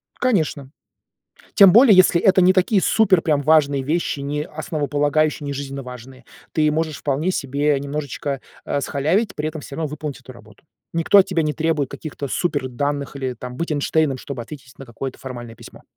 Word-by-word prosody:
Конечно. 155 - -1 0.8
Тем 195 -3 +8
более, 230 -2 +7
если 185 -2 +5
это 190 0 +4
не 185 +1 +6
такие 190 +1 +2
супер 195 -6 +3
прям 150 -3 +1
важные 145 -2 +3
вещи, 150 +1 -1
не 145 +1 -3
основополагающие, 150 0 -1
не 140 - -3
жизненно 140 0 -6
важные. 125 +1 -11 0.3
Ты 155 -1 +2
можешь 155 -1 -2
вполне 150 +5 -1
себе 140 -2 0
немножечко, 140 -1 -4 0.3
э, 145 - -1
схалявить, 180 +12 0
при 150 +1 -2
этом 155 -1 -7
всё 140 - -9
равно 160 -2 -2
выполнить 150 -1 -6
эту 130 - -12
работу. 110 -1 -18 0.3
Никто 165 +4 +4
от 195 - +6
тебя 175 -3 0
не 150 -1 -1
требует 155 -4 -1
каких-то 145 -2 -6
суперданных 140 -2 -2
или, 130 -2 -3
там, 125 +1 -8
быть 170 +1 -3
Эйнштейном, 145 -1 0
чтобы 130 -2 -6
ответить 135 +1 -12
на 135 - -9
какое-то 130 +3 -7
формальное 120 -3 -8
письмо. - - -14
145 Hz, 175 wpm, -21 LUFS, 135-160 Hz, 0.8 s, Тем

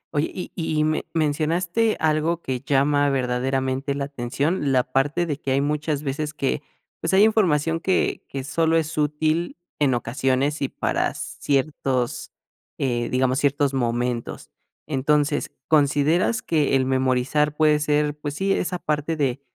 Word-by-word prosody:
Oye, 145 +2 +1
y 180 - -6
y 155 -3 0
me 155 0 0
mencionaste 170 +8 +1
algo 160 +2 +1
que 130 -2 -2
llama 145 +1 +2
verdaderamente 130 +1 -1
la 140 - -2
atención, 140 +3 -1
la 130 -1 +3
parte 140 +7 0
de 150 -4 -3
que 135 - -4
hay 135 - +2
muchas 150 0 -1
veces 150 +2 -3
que, 65 - -1 0.4
pues, - - +1
hay 200 - +6
información 165 -7 +2
que 185 +2 0
que 135 -1 -5
solo 165 +4 +1
es 160 0 -1
útil 155 +3 0 0.2
en 140 -4 +3
ocasiones 130 +5 0
y 135 - 0
para - - -1
ciertos, 135 -3 -2 0.5
eh, 120 -3 -1
digamos, 130 +1 +1
ciertos 140 -1 +1
momentos. 120 -1 -2 0.4
Entonces, 145 +1 +1 0.2
¿consideras 155 +8 +2
que 150 -4 +1
el 130 -1 +2
memorizar 130 +3 +1
puede 150 -1 +4
ser, 150 0 +1
pues 150 -1 -5
sí, 195 +3 +1
esa 180 -1 -1
parte 150 0 -2
de 140 -3 -1
145 Hz, 145 wpm, -23 LUFS, 135-155 Hz, 0.5 s, hay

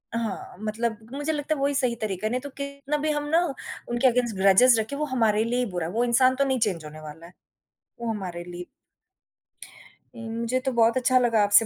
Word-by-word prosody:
हाँ, 225 -4 -4
मतलब 220 +1 -2 0.2
मुझे 290 +3 -2
लगता 295 +1 -1
है - - -6
वही 280 +1 +1
सही 250 -4 +1
तरीका 210 -2 -3
है, - - -1
नहीं 250 +1 -1
तो 285 - -7
कितना 280 +1 -3
भी 305 +1 -1
हम 295 -1 -1
ना 330 +3 +4 0.5
उनके 240 +2 +2
अगैन्स्ट 245 -3 +1
ग्रेजेस 200 +6 +6
रखें, 220 +6 -3
वो 300 - -1
हमारे 225 -6 +2
लिए 240 +2 -1
ही 250 - +1
बुरा 175 -2 -2
है, - - -5
वो 235 +2 +1
इंसान 255 +2 +4
तो 275 - +2
नहीं 265 -1 0
चेंज 190 -8 -1
होने 155 +1 -9
वाला 155 +2 -10
है, 175 - -15 0.7
वो 235 - -2
हमारे 180 -5 -5
लिए 175 0 -8 1.6
मुझे 230 +3 -1
तो 265 +1 -2
बहुत 235 0 +3
अच्छा 255 0 +3
लगा 230 -4 +3
आपसे 205 +2 +5
235 Hz, 215 wpm, -25 LUFS, 210-260 Hz, 1.6 s, ग्रेजेस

